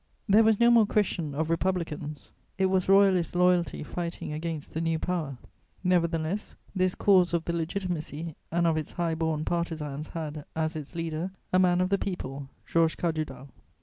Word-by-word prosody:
There 210 +2 +6
was 220 -2 +4
no 235 0 +6
more 230 -3 +6
question 175 -9 0
of 160 +2 -1
Republicans: 165 -4 -2 0.3
it 190 - +2
was 190 -1 +1
Royalist 195 -3 +4
loyalty 180 -2 +2
fighting 170 -1 -5
against 155 -1 -5
the 160 - -2
new 165 -1 +1
power; 155 -6 -2 0.5
nevertheless, 175 +1 0 0.2
this 185 -1 +1
cause 185 -4 +4
of 165 - -1
the 170 - -1
Legitimacy 165 -2 -3 0.2
and 170 +1 +2
of 165 -1 +3
its 155 - -4
high 170 -2 0
born 160 -1 -1
partisans 155 -4 -3
had, 155 -2 -5
as 160 +1 -1
its 155 +2 -7
leader, 165 +1 -2 0.2
a 185 - +5
man 180 -1 +4
of 185 - +1
the 200 0 +2
people, 140 -7 -5 0.2
Georges 165 -1 +2
Cadoudal. 155 -5 -3
170 Hz, 170 wpm, -28 LUFS, 155-185 Hz, 0.5 s, There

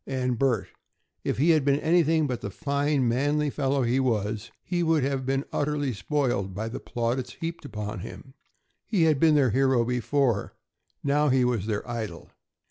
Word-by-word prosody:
And 125 -3 -1
Bert! 135 -4 +1 0.5
If - - -1
he 155 +6 +4
had 155 -3 +3
been 140 +1 +2
anything 160 -1 +3
but 125 -4 -3
the 100 - -4
fine, 140 +3 0
manly 145 +5 +1
fellow 135 -1 0
he 120 +2 +1
was, 110 -3 -1
he 175 -1 -1
would 160 -4 +2
have 135 -1 -1
been 135 +1 0
utterly 145 -2 0
spoiled 100 -3 -1
by 110 +3 -3
the 115 - -5
plaudits 120 +2 -2
heaped 165 -1 -6
upon 105 -5 -5
him. 130 +8 -10 0.5
He 200 -7 +2
had 155 -4 +3
been 160 -1 +5
their 135 -5 +4
hero 130 -1 +3
before; 125 -1 0 0.5
now 145 +1 +2
he 130 -1 +3
was 115 -5 0
their 105 0 -2
idol. 110 -8 -5
135 Hz, 175 wpm, -26 LUFS, 115-145 Hz, 0.5 s, been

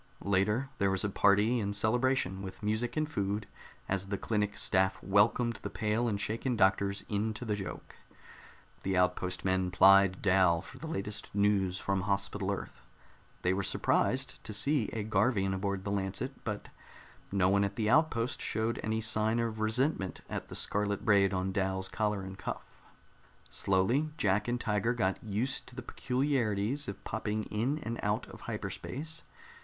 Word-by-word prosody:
Later, 105 +7 +1
there 100 -1 +3
was 95 -1 0
a 100 - 0
party 105 +5 +4
and 100 -1 -2
celebration, 110 -3 +1
with 95 +1 -8
music 110 +6 -1
and 155 0 +1
food, 100 -7 -2 0.4
as 95 0 -1
the 100 0 -2
clinic 105 0 -1
staff 95 0 +2
welcomed 110 +4 +3
the - - -4
pale 110 +2 0
and 105 -3 -1
shaken 115 +5 -1
doctors 100 0 +2
into 110 +3 -2
the 105 -2 0
joke. 95 -3 -7 0.8
The 95 -1 0
outpost 90 0 0
men 95 -1 +1
plied 95 0 +6
Dal 90 -4 +4
for 130 - -12
the 160 - -6
latest 105 -9 -4
news 100 -3 +2
from 95 0 -1
Hospital 100 0 -1
Earth. 95 -10 -6 0.6
They 90 - +3
were 95 - 0
surprised 95 - 0
to 110 - -6
see 115 +3 +2
a 110 - -3
Garvian 105 -3 +2
aboard 95 0 -2
the 100 - -3
Lancet, 100 +6 -2
but 105 -2 -4 0.6
no 95 -2 +3
one 100 +1 +3
at 100 0 -2
the 110 0 0
outpost 125 -2 +2
showed 110 +2 -1
any 110 0 -1
sign 110 0 +1
of 115 -2 -1
resentment 110 - 0
at - - -5
the - - -8
scarlet 100 0 0
braid 100 -2 +5
on 95 0 -1
Dal's 95 -1 -1
collar 105 -2 -1
and 95 0 -8
cuff. - - -4 0.9
Slowly 115 +11 +2
Jack 105 -5 +2
and 120 0 0
Tiger 110 +2 0
got 95 -4 0
used 110 +5 -1
to 125 - -11
the 130 - -6
peculiarities 125 -1 0
of 100 - -6
popping 110 0 -2
in 120 +8 0
and 115 0 -4
out - - 0
of - - -11
hyperspace. 160 +5 -4
105 Hz, 165 wpm, -31 LUFS, 95-115 Hz, 0.9 s, plied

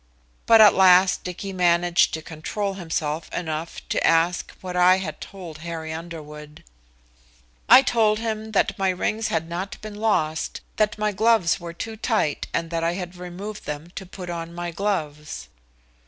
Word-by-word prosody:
But 225 -1 +8
at 210 -2 +8
last 185 0 +5
Dicky 185 +2 -6
managed 175 -1 +3
to 160 - -7
control 185 +6 -4
himself 160 -4 -3
enough 160 -1 -5
to - - 0
ask 165 +2 +2
what 180 -1 -6
I 180 +1 +6
had 180 -5 -6
told 175 -6 -9
Harry 160 -1 -5
Underwood. 150 -2 -9 1.1
"I 265 - +9
told 220 -4 +2
him 220 -1 -4
that 195 -1 +1
my 195 -1 +2
rings 215 +4 -1
had 165 0 -1
not 180 +4 -5
been 215 0 -7
lost, 205 -8 -1 0.2
that 215 -1 +1
my 210 0 0
gloves 215 -3 +3
were 170 -1 -7
too 220 +6 -6
tight 215 - 0
and 165 0 -2
that 165 -1 -1
I 170 +1 +1
had 180 -1 -6
removed 180 +4 -8
them 150 +3 -6
to 190 - -7
put 180 -1 -7
on 170 0 -6
my 175 0 -4
gloves." 155 - -3
180 Hz, 165 wpm, -24 LUFS, 165-200 Hz, 1.1 s, I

